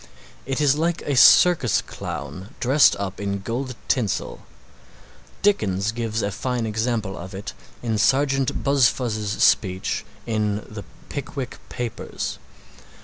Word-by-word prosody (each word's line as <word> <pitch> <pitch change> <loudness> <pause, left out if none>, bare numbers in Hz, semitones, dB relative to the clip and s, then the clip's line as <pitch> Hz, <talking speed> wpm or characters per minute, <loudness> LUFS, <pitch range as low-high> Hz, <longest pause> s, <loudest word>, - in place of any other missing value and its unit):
It 135 +1 -1
is 145 -2 +4
like 165 +2 -1
a 145 - -1
circus 135 - +6
clown 75 +8 -7
dressed 135 +3 +5
up 100 -1 -5
in 100 -1 -2
gold 125 +5 -4
tinsel 115 -8 -1 1.0
Dickens 105 - +2
gives 115 -1 -2
a 100 - -1
fine 125 +1 -2
example 110 -2 -1
of 95 +3 -8
it 100 - -6 0.3
in 110 -3 0
Sergeant 135 +2 +2
Buzfuz' 120 -6 +1
speech 95 -2 +2 0.2
in 105 -2 -1
the 105 -1 -8 0.3
"Pickwick 140 -2 -5
Papers." 120 -2 -5
115 Hz, 120 wpm, -23 LUFS, 100-135 Hz, 1.0 s, circus